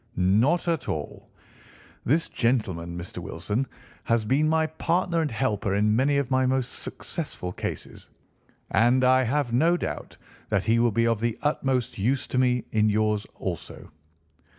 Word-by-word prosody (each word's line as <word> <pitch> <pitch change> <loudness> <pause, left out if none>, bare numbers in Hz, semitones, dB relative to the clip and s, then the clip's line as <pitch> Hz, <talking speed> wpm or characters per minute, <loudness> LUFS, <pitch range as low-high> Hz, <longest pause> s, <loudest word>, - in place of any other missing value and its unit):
"Not 110 - +2
at 165 -2 -1
all. 75 -1 -5 0.8
This 155 +7 +2
gentleman, 95 -9 -1
Mr. 90 +1 -7
Wilson, 105 +8 -3 0.4
has 115 -2 +1
been 145 +7 +2
my 160 0 +3
partner 165 +2 0
and 155 - 0
helper 105 -5 -1
in 105 +1 +3
many 140 +4 +2
of 140 -2 -1
my 130 0 +3
most 130 -1 0
successful 140 - -5
cases, - - -6 0.6
and 120 +3 +4
I 130 +1 +5
have 130 0 0
no 165 +8 +4
doubt - - -5 0.3
that - - +1
he 115 +1 +2
will 120 0 +4
be 115 +3 +2
of 115 -2 +1
the 115 0 -1
utmost 130 -6 0
use 130 +6 +1
to 130 - 0
me 125 -1 +2
in 110 -1 +3
yours 105 0 +1
also." - - -6
125 Hz, 155 wpm, -26 LUFS, 105-140 Hz, 0.8 s, I